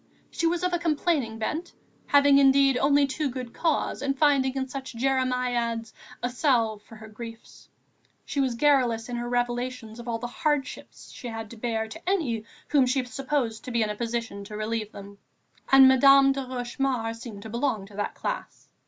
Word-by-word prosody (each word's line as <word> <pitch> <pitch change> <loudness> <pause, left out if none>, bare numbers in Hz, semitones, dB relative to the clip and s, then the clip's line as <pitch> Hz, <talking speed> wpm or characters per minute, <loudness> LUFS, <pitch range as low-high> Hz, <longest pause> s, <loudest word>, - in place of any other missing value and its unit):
She 335 - 0
was 345 +1 0
of 360 0 0
a 350 - +1
complaining 305 -8 0
bent, 305 +10 -3 0.3
having 285 -1 +6
indeed 275 -1 +5
only 280 +2 +4
too 275 +2 -2
good 250 -2 -6
cause 325 -3 -1
and 275 0 -1
finding 275 -3 +3
in 265 -1 -2
such 265 0 -7
jeremiads 250 -3 0 0.3
a 245 - +1
salve 235 -6 +1
for 225 - -15
her 220 0 -11
griefs. 230 +1 -11 0.6
She 285 - -3
was 260 -3 +1
garrulous 245 -4 +2
in 245 - -3
her 240 0 -4
revelations 245 -1 -2
of 235 - -9
all 230 -1 -1
the 235 - -6
hardships 285 +3 -3
she 250 - -8
had 225 -2 -6
to - - -9
bear 225 -1 -2
to 330 +10 -6
any 250 - 0 0.2
whom 275 -4 +4
she 255 +1 +1
supposed 260 -3 -2
in 230 -3 0
a - - -5
position 230 -3 -4
to 210 +1 -7
relieve 215 0 -3
them, 200 0 -11 0.5
and 270 0 +9
Madame 275 +1 +7
de 270 -1 -3
Rochemaure 245 -2 -2
seemed 225 -3 -9
to 220 - -8
belong 235 -4 -1
to 200 0 -15
that 205 - -3
class. - - -5
250 Hz, 180 wpm, -26 LUFS, 225-275 Hz, 0.6 s, and